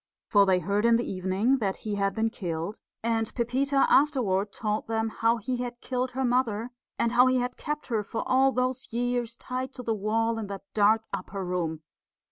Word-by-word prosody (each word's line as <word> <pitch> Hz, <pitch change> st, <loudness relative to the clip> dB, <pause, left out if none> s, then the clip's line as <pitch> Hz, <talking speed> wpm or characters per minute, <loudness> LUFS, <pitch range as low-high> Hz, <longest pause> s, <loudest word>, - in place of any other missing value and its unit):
For 200 Hz, -2 st, +5 dB
they 185 Hz, -1 st, +4 dB
heard 200 Hz, +4 st, 0 dB
in 235 Hz, 0 st, +5 dB
the 235 Hz, -, 0 dB
evening 195 Hz, +8 st, +1 dB
that 195 Hz, -4 st, -1 dB
he 210 Hz, -, -2 dB
had 200 Hz, -1 st, 0 dB
been 225 Hz, 0 st, +1 dB
killed; 170 Hz, 0 st, -4 dB, 0.2 s
and 225 Hz, -1 st, 0 dB
Pepita 270 Hz, +3 st, +2 dB
afterward 220 Hz, -9 st, +3 dB
told 215 Hz, 0 st, -2 dB
them 225 Hz, 0 st, 0 dB
how 230 Hz, +1 st, +1 dB
he 245 Hz, +3 st, -3 dB
had 245 Hz, -1 st, -5 dB
killed 255 Hz, 0 st, -2 dB
her 265 Hz, +1 st, 0 dB
mother, 245 Hz, -2 st, 0 dB, 0.3 s
and 235 Hz, -, +1 dB
how 245 Hz, +1 st, +6 dB
he 255 Hz, 0 st, +3 dB
had 250 Hz, 0 st, -1 dB
kept 300 Hz, 0 st, -4 dB
her 225 Hz, -3 st, +1 dB
for 215 Hz, +2 st, -4 dB
all 265 Hz, +1 st, +4 dB
those 255 Hz, 0 st, -1 dB
years 240 Hz, 0 st, -1 dB
tied 255 Hz, +1 st, -5 dB
to 250 Hz, -, -7 dB
the 230 Hz, -, 0 dB
wall 225 Hz, +2 st, 0 dB
in 215 Hz, -, -4 dB
that 195 Hz, -1 st, -6 dB
dark 215 Hz, +1 st, +4 dB
upper 195 Hz, 0 st, -4 dB
room. 165 Hz, -3 st, -2 dB
225 Hz, 200 wpm, -27 LUFS, 205-250 Hz, 0.3 s, how